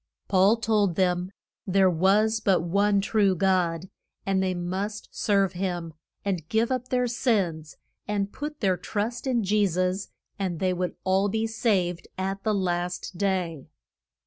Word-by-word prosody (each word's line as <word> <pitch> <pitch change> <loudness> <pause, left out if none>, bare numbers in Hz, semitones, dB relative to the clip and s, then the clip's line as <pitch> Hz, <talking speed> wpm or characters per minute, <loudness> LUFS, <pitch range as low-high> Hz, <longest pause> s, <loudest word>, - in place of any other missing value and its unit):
Paul 195 +4 +4
told 210 -5 +1
them 180 0 +1 0.4
there 190 0 +4
was 200 +6 +3
but 195 -4 +2
one 200 +3 +2
true 200 -2 +2
God, 180 -2 +1 0.3
and 195 -1 +1
they 185 -1 0
must 190 +4 -4
serve 195 -3 +1
him 175 -3 -3 0.3
and 175 -5 -2
give 225 +3 +1
up 255 -1 -1
their 250 -1 +1
sins, 195 - -1 0.3
and 205 -1 -1
put 300 +1 -6
their 190 -4 +2
trust 220 +8 -3
in 240 -4 +1
Je 205 +1 +3
sus, 185 +2 -1 0.3
and 180 -4 -2
they 185 -1 +1
would 180 0 -2
all 190 +2 +2
be 220 +2 0
saved 195 -6 0
at 195 +1 -3
the 215 -1 +1
last 180 -1 -2
day. 180 -7 -1
195 Hz, 150 wpm, -26 LUFS, 180-210 Hz, 0.4 s, Paul